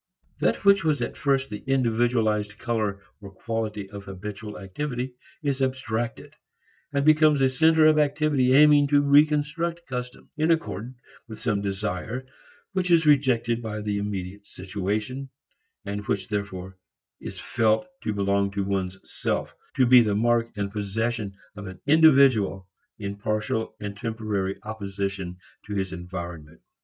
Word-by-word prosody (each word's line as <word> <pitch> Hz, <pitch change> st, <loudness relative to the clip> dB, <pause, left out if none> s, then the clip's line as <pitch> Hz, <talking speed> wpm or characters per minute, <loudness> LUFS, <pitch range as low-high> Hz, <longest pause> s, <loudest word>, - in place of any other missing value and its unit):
That -, -, 0 dB
which 200 Hz, -2 st, +6 dB
was 155 Hz, -4 st, +1 dB
at -, -, -4 dB
first 135 Hz, 0 st, 0 dB
the 105 Hz, -, -6 dB
individualized 115 Hz, -4 st, +1 dB
color 110 Hz, -4 st, -2 dB, 0.2 s
or 100 Hz, -, -9 dB
quality 110 Hz, -1 st, -3 dB
of 100 Hz, -1 st, -8 dB
habitual 105 Hz, +2 st, -7 dB
activity 125 Hz, +5 st, -4 dB, 0.3 s
is 140 Hz, -2 st, -1 dB
abstracted, 120 Hz, -3 st, -2 dB, 0.6 s
and 140 Hz, 0 st, 0 dB
becomes 155 Hz, -1 st, +5 dB
a 135 Hz, -, +4 dB
center 160 Hz, +3 st, +4 dB
of 155 Hz, 0 st, +5 dB
activity 145 Hz, -3 st, +2 dB
aiming 145 Hz, 0 st, +6 dB
to 145 Hz, 0 st, +4 dB
reconstruct 155 Hz, +4 st, +2 dB
customs 125 Hz, -1 st, -6 dB
in 155 Hz, +1 st, +1 dB
accord 130 Hz, -, -1 dB, 0.3 s
with 110 Hz, -2 st, -9 dB
some 105 Hz, -5 st, +1 dB
desire 100 Hz, +4 st, -3 dB, 0.5 s
which 185 Hz, -2 st, -1 dB
is 165 Hz, -2 st, +5 dB
rejected 120 Hz, -5 st, +3 dB
by 110 Hz, -2 st, -4 dB
the 105 Hz, -1 st, -2 dB
immediate 100 Hz, 0 st, -5 dB
situation 105 Hz, +8 st, -4 dB, 0.6 s
and 100 Hz, +1 st, -4 dB
which 95 Hz, -2 st, -1 dB
therefore 95 Hz, -2 st, -4 dB, 0.4 s
is -, -, -8 dB
felt 110 Hz, +7 st, +1 dB, 0.2 s
to -, -, -2 dB
belong 100 Hz, -1 st, +1 dB
to 100 Hz, -1 st, -1 dB
one's 95 Hz, -1 st, -2 dB
self, -, -, -3 dB, 0.2 s
to 130 Hz, -, +4 dB
be 125 Hz, 0 st, +8 dB
the 105 Hz, -3 st, +1 dB
mark 115 Hz, +1 st, +2 dB
and 100 Hz, -1 st, -2 dB
possession 105 Hz, 0 st, -2 dB, 0.2 s
of 100 Hz, -1 st, -8 dB
an 95 Hz, -1 st, -9 dB
individual 135 Hz, -, +5 dB, 0.3 s
in 100 Hz, -1 st, -5 dB
partial 110 Hz, +1 st, -2 dB
and 105 Hz, -1 st, -5 dB
temporary 105 Hz, -3 st, -2 dB
opposition 100 Hz, -3 st, -4 dB, 0.3 s
to 105 Hz, -, -4 dB
his 95 Hz, -1 st, -2 dB
environment. 85 Hz, -3 st, -7 dB
110 Hz, 145 wpm, -25 LUFS, 100-135 Hz, 0.6 s, be